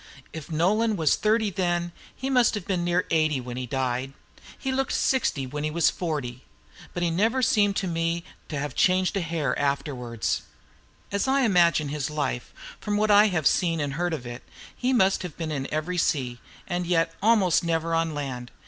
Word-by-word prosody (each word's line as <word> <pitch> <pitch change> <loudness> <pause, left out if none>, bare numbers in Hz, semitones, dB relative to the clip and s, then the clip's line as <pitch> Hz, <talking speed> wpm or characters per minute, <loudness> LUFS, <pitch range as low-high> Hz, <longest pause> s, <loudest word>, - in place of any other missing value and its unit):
If 160 +1 -8
Nolan 210 +8 +2
was 160 -5 +3
thirty 215 -1 +1
then, 175 -2 -1 0.2
he 265 - -4
must 250 -4 +3
have 205 -4 -5
been 185 -3 -1
near 175 +1 +1
eighty 155 -3 +2
when 125 -1 -6
he 125 0 -4
died. 130 +1 -2 0.4
He 265 - -3
looked 270 +1 -1
sixty 225 - +1
when 145 +3 -5
he 155 - 0
was 165 +2 +2
forty. 140 -8 -4 0.5
But 175 - -1
he 170 - +1
never 225 +9 +1
seemed 205 -3 +3
to 190 - -1
me 165 0 -1 0.3
to 145 -1 -2
change 185 +3 +2
a 195 - 0
hair 160 -6 -1
afterwards. 135 -5 -1 0.7
As 200 +5 0
I 270 +1 +3
imagine 170 - +3
his 145 -2 -2
life, 145 -5 -3 0.3
from 210 -1 -1
what 215 0 +2
I 205 +1 +7
have 175 -7 -1
seen 165 +1 +2
and 145 -2 -2
heard 175 +4 -1
of 125 - -9
it, 120 +1 -7 0.3
he 255 +1 0
must 195 -6 +3
have 180 -5 -7
been 160 -2 -3
in 135 -3 -4
every 170 +4 -1
sea, 125 -7 0 0.3
and 175 -1 -2
yet 165 -1 +1
almost 200 -6 +4
never 165 0 0
on 165 -1 0
land. 130 -4 -5
165 Hz, 190 wpm, -26 LUFS, 145-195 Hz, 0.7 s, I